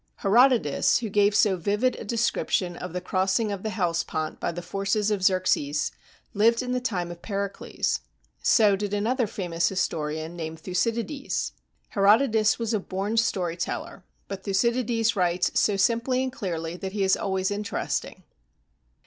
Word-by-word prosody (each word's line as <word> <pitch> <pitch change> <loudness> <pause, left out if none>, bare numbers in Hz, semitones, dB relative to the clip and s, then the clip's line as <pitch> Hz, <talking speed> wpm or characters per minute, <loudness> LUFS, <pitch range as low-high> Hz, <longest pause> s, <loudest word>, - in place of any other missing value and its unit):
Herodotus, 230 - +4
who 230 -3 -3
gave 205 +1 +3
so 205 -3 +4
vivid 205 +8 +1
a - - -7
description 205 -5 0
of 180 0 -6
the 180 +1 -4
crossing 190 +4 0
of 200 -2 -4
the 220 - -3
Hellespont 170 -5 -2
by - - -1
the 175 +1 -6
forces 200 +3 0
of 205 -2 0
Xerxes, 185 -6 +1 0.4
lived 230 +4 +3
in 250 - -3
the 250 - +1
time 180 -8 -2
of 170 0 -10
Pericles. 200 -1 -2 0.4
So 210 -5 +5
did 205 +1 -2
another 235 +4 0
famous 175 -4 -1
historian 160 -3 -2
named 160 -1 -6
Thucydides. 230 - -2 0.4
Herodotus 215 +1 +4
was 230 -1 -2
a 215 - +2
born 195 +3 -3
story 185 -7 +1
teller, 170 - -5 0.2
but 195 -1 -6
Thucydides 230 +2 +1
writes 180 -1 +1
so 205 -2 +2
simply 235 +5 +2
and 260 -1 -3
clearly 165 -6 -4
that 190 +1 -6
he 205 -2 0
is 190 - +4
always 190 -1 -1
interesting. 205 0 -3
200 Hz, 155 wpm, -26 LUFS, 180-225 Hz, 0.4 s, So